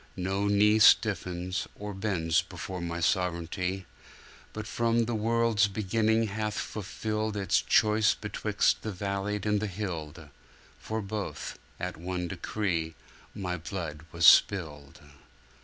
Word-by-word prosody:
No 95 +2 -1
knee 105 +1 +4
Stiffens, 90 -4 +3
or 105 0 -6
bends 90 -6 +1
before 95 -2 -7
My 85 0 -3
Sov'reignty, 90 +1 -1 0.7
But 110 0 -6
from 115 +1 +1
the 120 - -2
world's 115 -1 +2
beginning 110 +3 +1
hath 105 0 -3
fulfilled 110 +1 -3
Its 100 -1 +2
choice 105 0 +3
betwixt 105 0 0
the 110 - -4
valleyed 100 +1 -3
and 105 -1 +2
the 110 - -2
hilled. 85 -6 -6 0.5
For 110 0 -4
both, 105 +1 -5 0.2
at - - -4
one 90 +1 -3
decree, 85 -3 -2 0.4
My 90 -2 -3
Blood 80 -3 -5
was 85 0 +1
spilled. 75 -8 +4
100 Hz, 125 wpm, -29 LUFS, 90-105 Hz, 0.7 s, knee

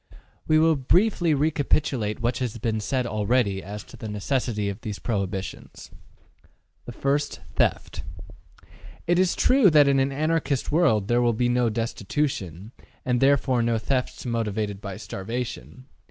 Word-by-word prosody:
We 155 - +4
will 160 0 +4
briefly 170 - +2
recapitulate 145 -6 0
what 120 +3 0
has 120 -3 -3
been 110 -1 -1
said 125 +4 -1
already 105 -2 0
as 105 +2 -7
to - - -14
the 110 - -7
necessity 105 0 -1
of 100 +3 -5
these 105 -3 -5
prohibitions. 100 -4 -4 1.0
1. 140 +1 +1 0.4
Theft. - - 0 1.0
It 175 +1 +2
is 185 -1 +2
true 255 -6 +5
that 150 -3 +6
in 140 -1 +3
an 135 +1 +1
Anarchist 155 -1 -1
world 140 - +3
there 120 +1 +2
will 120 -1 +3
be 120 +2 +1
no 120 -1 +2
destitution, 110 - -3 0.3
and 125 -1 +1
therefore 135 -2 +3
no 115 0 +1
thefts 125 +4 -2
motivated 105 -4 -2
by 100 -2 -6
starvation. 115 - -6
120 Hz, 140 wpm, -25 LUFS, 105-140 Hz, 1.0 s, that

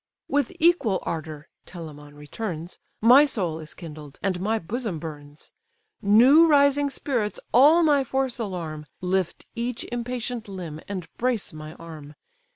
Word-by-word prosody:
"With 285 -3 0
equal 310 - +3
ardour 155 -2 -5 0.2
(Telamon 150 -4 -10
returns) 165 +3 -6 0.2
My 250 +6 +8
soul 180 - -1
is 155 -1 -10
kindled, 150 -4 -10
and 185 -3 0
my 220 +3 +1
bosom 215 0 -4
burns; 150 -2 -10 0.5
New 250 +11 +7
rising 285 -1 +4
spirits 245 -6 -2
all 300 +8 +7
my 290 -3 +4
force 265 -1 -2
alarm, 165 -8 -5
Lift 185 -1 -1
each 235 0 -3
impatient 240 -1 -4
limb, 175 -6 -7
and 185 -5 -5
brace 235 -7 -1
my 155 0 -9
arm. 155 -3 -11
200 Hz, 135 wpm, -25 LUFS, 160-250 Hz, 0.5 s, My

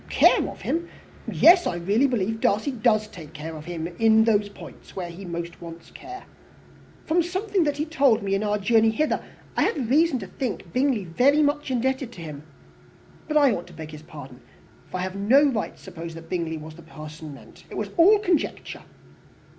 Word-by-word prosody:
"Care - - +4
of - - -11
him! 340 +1 -2 0.4
Yes, 350 +1 +6
I - - -1
really 200 +10 +2
believe 225 -3 -1
Darcy 215 +8 +1
does 215 -3 +2
take 165 -7 -12
care 160 +1 -7
of 155 0 -9
him 165 -2 -4
in 220 -1 +5
those 210 -2 +2
points 200 - -13
where 175 -2 -4
he 185 +3 -10
most 170 0 -6
wants 165 0 -10
care. 375 +2 -10 0.8
From 335 +2 +2
something 375 +1 0
that 290 -1 -1
he 300 - -1
told 275 -8 +2
me 195 -1 -1
in 195 - +1
our 210 0 0
journey 225 +2 +3
hither, 300 +8 0 0.3
I - - +1
have 255 -6 0
reason 310 0 +4
to 210 - -6
think 200 -5 -5
Bingley 255 -6 +1
very 275 - +3
much 290 0 0
indebted 260 0 -1
to 175 - -10
him. 150 -3 -7 0.9
But 305 -1 +1
I 285 -3 +5
ought 175 -3 -5
to 180 - -14
beg 160 -1 -8
his 155 -1 -10
pardon, 140 -5 -11 0.5
for - - -4
I - - -3
have 185 +1 -4
no 230 +9 +4
right 220 -4 -3
to - - -19
suppose 170 -3 -8
that 165 0 -11
Bingley 165 -3 -2
was 155 +1 -9
the 170 - -13
person 155 -2 -10
meant. - - -16
It - - -7
was - - -3
all 380 +5 +7
conjecture." 365 -6 -2
210 Hz, 200 wpm, -24 LUFS, 170-280 Hz, 0.9 s, all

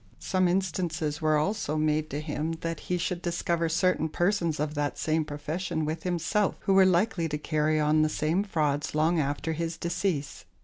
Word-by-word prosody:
Some 185 -1 +1
instances 170 -4 -1
were 155 -1 +3
also 155 -1 -1
made 155 0 +1
to 145 - -3
him 155 +1 -2
that 165 0 -3
he 180 - +2
should 175 0 -2
discover 170 -1 0
certain 165 -1 +1
persons 175 -2 0
of 150 0 -1
that 145 -1 -2
same 160 0 +1
profession 155 +2 -3
with 155 +2 -3
himself, 180 +3 0
who 195 - +1
were 190 -1 +7
likely 180 -2 +1
to 150 - -2
carry 155 0 +1
on 150 +1 +3
the 155 - +3
same 155 +5 0
frauds 150 -7 -1
long 160 +2 +3
after 145 +2 -1
his 165 +1 -3
decease. 170 -4 -2
160 Hz, 180 wpm, -28 LUFS, 155-175 Hz, -, were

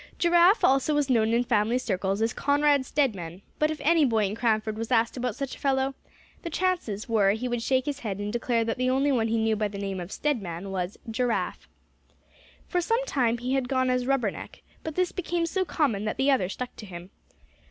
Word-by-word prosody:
Giraffe 345 +4 +4
also 270 +3 +3
was 290 -2 +1
known 225 -2 +3
in 235 +1 +2
family 230 0 +1
circles 195 -3 -1
as 225 - 0
Conrad 285 -1 +2
Stedman; 195 - -1 0.2
but 305 - +3
if 310 -1 -4
any 320 +2 +4
boy 225 -6 +2
in 195 - -2
Cranford 220 -1 0
was 225 +2 -5
asked 230 -1 +2
about 250 -3 -2
such 275 -2 -4
a - - -16
fellow, 270 -1 +1 0.5
the 340 - -5
chances 335 - -1
were 205 -4 +3
he 235 +4 -3
would 240 -1 -2
shake 260 +2 +1
his 285 -1 -3
head, 205 -6 -4
and 205 +1 -4
declare 235 -1 0
that 230 +2 -2
the 255 0 +1
only 270 +2 +2
one 230 -4 +1
he 230 +1 0
knew 220 0 +1
by 210 0 0
the 200 0 -8
name 195 -1 -3
of 175 +2 -7
Stedman 195 - -3
was 185 0 -3
"Giraffe," 240 +1 -2 1.0
For 355 - 0
some 455 +8 0
time 240 - +1
he 250 +2 -3
had 265 -2 0
gone 260 -1 +1
as 250 0 0
"Rubberneck," 250 -7 -2 0.2
but 315 -2 -5
this 365 -1 +1
became 345 -2 -2
so 375 +3 -1
common 240 - 0
that 215 - -2
the 275 +1 +3
other 190 -9 +1
stuck 250 +5 -6
to 210 - -9
him. 175 0 -9
245 Hz, 215 wpm, -27 LUFS, 215-280 Hz, 1.0 s, Giraffe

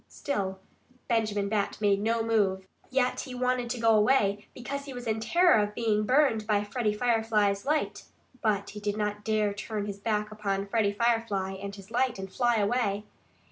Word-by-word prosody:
Still 195 -8 -3 0.5
Benjamin 215 -3 0
Bat 205 -1 -1
made 200 -1 +2
no 225 +1 +1
move. 200 -4 +1 0.2
Yet 255 -1 +1
he 255 -3 -6
wanted 250 -1 0
to 245 0 -3
go 230 0 +3
away 210 -2 +2
because 280 +3 -5
he 275 - -7
was 245 0 -7
in 220 -1 0
terror 345 +4 +4
of 210 0 -3
being 215 -2 +1
burned 255 -6 +3
by 205 -1 +2
Freddie 210 +1 -1
Firefly's 220 -3 +1
light. 305 +1 -1 0.4
But 205 -3 0
he 210 - -8
did 205 0 -2
not 210 0 -2
dare 215 -2 +1
turn 210 0 -4
his 200 -1 -6
back 210 0 -1
upon 200 -2 -2
Freddie 205 0 +1
Firefly 225 -4 0
and 200 0 -6
his 195 +1 -13
light 250 0 +1
and 190 0 -7
fly 240 -1 +2
away. 210 -1 +1
215 Hz, 180 wpm, -28 LUFS, 205-235 Hz, 0.5 s, terror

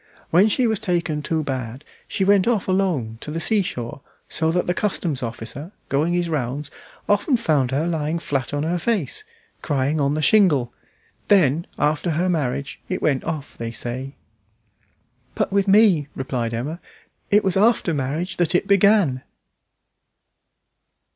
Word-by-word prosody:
When 185 +6 +5
she 245 +4 +1
was 220 -3 +1
taken 170 -7 -1
too 160 +1 -1
bad 130 -2 -5 0.2
she 190 - -1
went 200 0 +4
off 230 -5 +1
quite 185 - 0
alone 145 -13 -1
to - - -6
the 160 +2 -3
sea 215 +4 +2
shore, 125 -6 -5 0.3
so 160 0 -1
that 180 +2 +1
the 180 - 0
customs 175 -7 -2
officer, 125 - -5 0.2
going 150 +5 +1
his 175 -1 0
rounds, 145 -2 -3 0.4
often 205 +6 +2
found 150 - +1
her 140 +5 0
lying 160 -1 -1
flat 140 -6 -2
on 145 0 -1
her 175 +3 -1
face, 195 - -1 0.4
crying 145 +2 0
on 140 +1 +1
the 155 - -1
shingle. 150 - +4 0.5
Then, 170 -5 +3
after 150 +3 0
her 170 +3 0
marriage, 140 -2 -2
it 185 - -1
went 140 -4 +1
off, 155 -4 -5
they 115 -1 -5
say." 125 +4 -5 1.2
"But - - -1
with 200 0 +2
me," 195 -7 +5
replied 120 -3 -3
Emma, 145 +9 -4 0.5
"it 205 +1 +4
was 190 -2 +1
after 210 -3 +3
marriage 150 +6 -2
that 175 -1 +1
it 180 - +2
began." 200 -9 +3
160 Hz, 160 wpm, -22 LUFS, 135-190 Hz, 1.2 s, When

